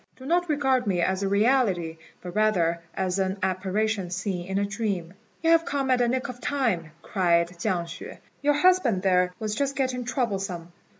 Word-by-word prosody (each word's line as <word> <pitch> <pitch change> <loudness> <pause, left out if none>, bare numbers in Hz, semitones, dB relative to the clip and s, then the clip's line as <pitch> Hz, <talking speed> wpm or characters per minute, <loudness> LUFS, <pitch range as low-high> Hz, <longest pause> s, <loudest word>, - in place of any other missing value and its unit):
Do 260 - -12
not 350 +3 +1
regard 265 -5 +1
me 185 -3 +1
as 190 +2 +1
a 200 - 0
reality, 200 -7 +2 0.3
but 180 -1 -6
rather 180 -6 +2 0.2
as 190 0 -1
an 190 +1 0
apparition 190 +1 0
seen 185 -1 -3
in 190 0 -2
a 200 - +1
dream." 200 -5 -3 0.3
"You 325 - +4
have 330 0 +5
come 275 -5 -1
at 255 - +3
the 245 - +3
nick 255 +2 -1
of 245 0 -8
time," 230 - 0
cried 170 -3 +2
Chiang 175 -3 0
hsüeh; 170 - -9 0.2
"your 290 +1 +3
husband 295 - +3
there 180 -1 +3
was 215 -1 -3
just 275 +3 -1
getting 255 -2 -1
troublesome." 195 - -2
205 Hz, 185 wpm, -26 LUFS, 180-255 Hz, 0.3 s, have